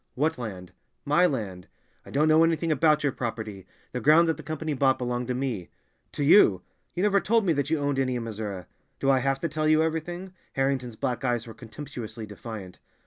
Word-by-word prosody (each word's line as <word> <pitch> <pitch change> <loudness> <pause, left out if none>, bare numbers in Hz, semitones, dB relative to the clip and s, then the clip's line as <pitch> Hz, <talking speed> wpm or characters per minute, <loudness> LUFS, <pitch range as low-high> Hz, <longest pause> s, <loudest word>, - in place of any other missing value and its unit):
"What 150 +1 0
land?" 95 -6 -6 0.3
"My 170 +5 +4
land." 100 - -4 0.4
"I - - -10
don't 150 +3 +2
know 155 +1 +6
anything 165 0 +1
about 155 0 +3
your 140 - +2
property; 110 -6 -5 0.2
the 125 - -4
ground 155 +6 +6
that 160 - +1
the - - -9
Company 155 +1 -3
bought 135 -1 +3
belonged 125 -1 -2
to 125 - -1
me." 125 -9 -3 0.4
"To 145 - -2
you! 140 - +6 0.3
You 180 - 0
never 200 -1 +4
told 225 +2 +2
me 170 - +3
that 140 -1 -1
you 160 - +2
owned 145 -1 0
any 130 -1 0
in 120 - -2
Missouri." 105 -5 -5 0.3
"Do 135 - +3
I 135 - +4
have 135 +1 0
to - - 0
tell 155 0 -1
you 155 +1 +5
everything?" 175 +3 -3 0.2
Harrington's 135 -3 -1
black 125 +4 -2
eyes 120 -3 0
were 115 - -9
contemptuously 120 -2 -8
defiant. 105 -2 -9
135 Hz, 205 wpm, -27 LUFS, 115-155 Hz, 0.4 s, know